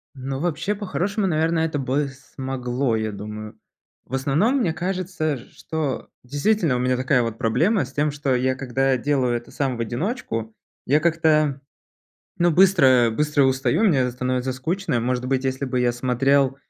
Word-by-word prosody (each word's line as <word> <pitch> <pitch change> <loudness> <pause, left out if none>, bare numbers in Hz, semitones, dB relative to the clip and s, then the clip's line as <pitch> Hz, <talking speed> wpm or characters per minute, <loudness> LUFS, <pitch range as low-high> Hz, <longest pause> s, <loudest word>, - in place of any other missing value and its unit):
Ну, 135 0 -4
вообще, 170 +5 -1
по-хорошему, 200 +1 -2
наверное, 160 0 +1
это 155 -2 -2
бы 140 +2 0
смогло, 130 -2 -3
я 110 0 -2
думаю. 105 +1 -8 0.5
В - - -15
основном 150 - +2
мне 210 -11 +1
кажется, 180 -4 -2
что 140 +3 -5
действительно 145 - +1
у - - -1
меня 125 0 +1
такая 130 0 +2
вот 115 -1 -4
проблема 165 - +2
с - - -14
тем, 150 +1 +1
что 140 -2 0
я, 130 +1 +1
когда 135 0 0
делаю 130 -2 +1
это 120 - -11
сам 135 -4 -2
в - - -10
одиночку, 115 - -3 0.3
я 145 +3 +3
как-то, 155 -3 +2 0.8
ну, 175 0 +4
быстро 150 -10 +5
быстро 150 +1 +2
устаю, 130 - +1
мне 135 - +3
становится 125 +1 -2
скучно. 165 +5 -2
И, - - +3
может 125 +1 -1
быть, 130 0 0
если 130 +1 -1
бы 125 -1 -1
я 120 -1 +2
смотрел 135 +2 +2
135 Hz, 165 wpm, -23 LUFS, 125-160 Hz, 0.8 s, быстро